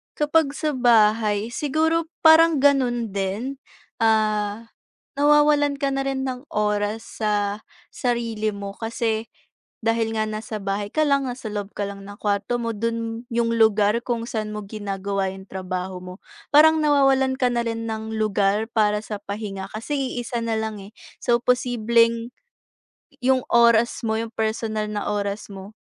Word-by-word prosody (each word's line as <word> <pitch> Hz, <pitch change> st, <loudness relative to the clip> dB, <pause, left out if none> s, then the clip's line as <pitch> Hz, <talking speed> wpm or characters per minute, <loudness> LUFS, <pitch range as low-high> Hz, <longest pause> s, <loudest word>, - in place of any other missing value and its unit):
Kapag 300 Hz, -1 st, +2 dB
sa 305 Hz, +1 st, -1 dB
bahay, 220 Hz, -4 st, +3 dB
siguro, 320 Hz, +5 st, 0 dB, 0.2 s
parang 320 Hz, -2 st, +6 dB
gano'n 250 Hz, -5 st, +2 dB
din. 200 Hz, +8 st, -3 dB, 0.4 s
Ah, 215 Hz, 0 st, +1 dB, 0.5 s
na-wawalan 295 Hz, 0 st, +4 dB
ka 280 Hz, -, +1 dB
na 270 Hz, 0 st, -1 dB
rin 270 Hz, -1 st, -1 dB
ng 260 Hz, 0 st, -4 dB
oras 210 Hz, +1 st, 0 dB, 0.2 s
sa, 205 Hz, -1 st, 0 dB, 0.3 s
sarili 230 Hz, -3 st, -1 dB
mo 200 Hz, 0 st, -6 dB
kasi, 225 Hz, 0 st, -2 dB, 0.5 s
dahil 225 Hz, 0 st, 0 dB
nga 215 Hz, -1 st, -1 dB
nasa 215 Hz, 0 st, -5 dB
bahay 200 Hz, +1 st, -3 dB
ka 310 Hz, -1 st, +2 dB
lang, 280 Hz, -1 st, +2 dB
nasa 245 Hz, -3 st, -5 dB
loob 205 Hz, -1 st, -5 dB
ka 205 Hz, -1 st, -3 dB
lang 200 Hz, 0 st, -9 dB
ng 205 Hz, 0 st, -11 dB
kwarto 205 Hz, +4 st, -1 dB
mo, 230 Hz, -2 st, -3 dB
do'n 230 Hz, +1 st, -3 dB
'yong 230 Hz, 0 st, +1 dB
lugar 220 Hz, +1 st, +3 dB
kung 235 Hz, -1 st, -2 dB
san 215 Hz, -3 st, -3 dB
mo 210 Hz, -, -4 dB
ginagawa 195 Hz, -2 st, -3 dB
'yong 190 Hz, 0 st, -12 dB
trabaho 185 Hz, 0 st, -4 dB
mo. 180 Hz, 0 st, -8 dB, 0.4 s
Parang 310 Hz, +1 st, +6 dB
nawawalan 270 Hz, -2 st, +3 dB
ka 250 Hz, -, +4 dB
na 240 Hz, -1 st, -1 dB
rin 230 Hz, 0 st, -3 dB
ng 220 Hz, 0 st, -4 dB
lugar 210 Hz, 0 st, +1 dB
para 210 Hz, -2 st, +1 dB
sa 215 Hz, 0 st, -6 dB
pahinga 200 Hz, -1 st, -6 dB
kasi 230 Hz, +7 st, -3 dB, 0.2 s
i-isa 240 Hz, -1 st, -3 dB
na 230 Hz, -, -1 dB
lang, 220 Hz, -1 st, -3 dB
eh. 200 Hz, -, -14 dB, 0.2 s
So, 240 Hz, -1 st, +1 dB
posibleng, 235 Hz, -1 st, +2 dB, 1.0 s
'yong 260 Hz, 0 st, +4 dB
oras 235 Hz, 0 st, +4 dB
mo, 220 Hz, 0 st, 0 dB
'yong 230 Hz, -, -5 dB
personal 220 Hz, -1 st, -1 dB
na 210 Hz, -1 st, -3 dB
oras 205 Hz, 0 st, -3 dB
mo, 195 Hz, +1 st, -10 dB
225 Hz, 155 wpm, -23 LUFS, 210-245 Hz, 1.0 s, parang